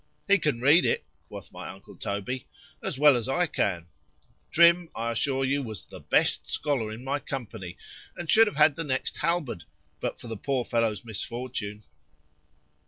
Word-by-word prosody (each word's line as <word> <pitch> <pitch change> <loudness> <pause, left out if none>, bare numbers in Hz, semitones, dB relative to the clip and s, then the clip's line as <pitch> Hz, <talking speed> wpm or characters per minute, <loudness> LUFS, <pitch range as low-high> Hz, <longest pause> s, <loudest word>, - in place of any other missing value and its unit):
——He 200 0 +5
can 150 -7 0
read 150 +7 +6
it, - - +1 0.2
quoth - - -10
my - - -8
uncle 95 +1 -12
Toby, 100 +6 -4 0.3
as - - -3
well 145 -1 +7
as 120 +1 -1
I 175 +7 +2
can.——Trim, 165 - +1
I 115 +1 -1
assure 135 +3 0
you, 140 +2 +1
was 110 -7 -6
the - - -11
best - - +1
scholar 130 -7 0
in 110 +3 -8
my 140 +2 -1
company, 110 - -6 0.4
and 175 - -5
should 225 +7 +7
have 210 - -3
had 150 -1 +5
the 165 - -3
next 130 -4 -1
halberd, 160 - -1 0.3
but - - -3
for - - -11
the 115 -2 -5
poor 130 +1 -1
fellow's 115 -1 0
misfortune. 110 -1 -4
130 Hz, 170 wpm, -27 LUFS, 110-150 Hz, 0.4 s, well